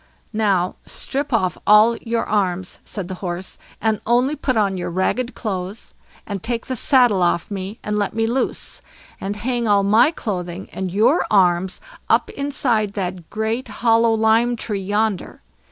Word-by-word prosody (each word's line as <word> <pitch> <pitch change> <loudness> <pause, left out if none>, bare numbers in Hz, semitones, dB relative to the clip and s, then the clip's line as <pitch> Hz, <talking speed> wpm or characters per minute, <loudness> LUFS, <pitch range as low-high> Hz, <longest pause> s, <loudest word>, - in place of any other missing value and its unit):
"Now, 195 -5 +1
strip 280 +2 -2
off 185 -8 0
all 215 +3 +6
your 230 0 -2
arms", 185 -3 -1
said 195 -4 -5
the 185 - -5
Horse, 180 0 -5 0.2
"and 220 -2 0
only 250 +5 +2
put 255 -5 -1
on 200 -3 +2
your 180 - -3
ragged 210 +8 -1
clothes, 195 -1 -4 0.3
and 200 -3 -5
take 230 +2 -2
the 260 - -3
saddle 245 -5 +4
off 175 +2 +1
me, 195 +2 -5
and 210 0 -1
let 205 +1 -1
me 225 0 +1
loose, 245 +4 0 0.4
and 200 +1 -3
hang 240 +1 -1
all 200 -1 +4
my 220 +7 +5
clothing 185 - -5
and 190 -2 -4
your 220 - +3
arms 185 -2 +2 0.3
up - - +3
inside 245 -7 0
that 180 -4 -4
great 220 +4 -2
hollow 230 +1 +3
lime 225 +2 +3
tree 210 -3 -3
yonder. 205 +1 -2
210 Hz, 160 wpm, -21 LUFS, 190-235 Hz, 0.4 s, all